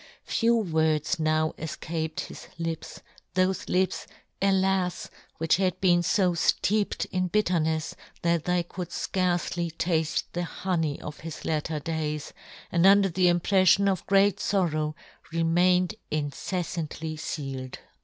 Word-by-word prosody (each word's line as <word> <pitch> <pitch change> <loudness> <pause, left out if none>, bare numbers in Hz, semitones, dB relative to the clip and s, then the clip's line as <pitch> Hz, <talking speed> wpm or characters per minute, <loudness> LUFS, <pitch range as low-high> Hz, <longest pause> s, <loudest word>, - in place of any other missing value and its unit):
Few 235 0 +2
words 160 -7 +1
now 155 0 +1
efcaped 160 0 -4
his - - -9
lips; 165 -1 -5 0.3
thofe 185 0 +1
lips, 185 0 0 0.3
alas! 190 -2 +1 0.3
which 165 +1 +2
had 185 -1 0
been 175 -2 +4
fo 180 +1 +2
fteeped 200 +5 +1
in 185 0 0
bitternefs 165 -6 +1 0.3
that 170 -2 +1
they 180 -1 +1
could 175 0 -6
fcarcely 175 -2 -1
tafle 160 -1 0
the 175 - -1
honey 170 -4 -2
of 150 0 -8
his 160 -1 -8
latter 155 0 -1
days, 150 -1 -3 0.4
and 175 +2 +4
under 200 0 +6
the 180 +1 +2
impreflion 185 +3 +4
of 190 -3 0
great 200 0 +4
forrow 155 -7 0 0.4
remained 175 +3 +3 0.2
inceffantly 155 +1 -3
fealed. 135 -4 -5
170 Hz, 125 wpm, -27 LUFS, 160-185 Hz, 0.4 s, under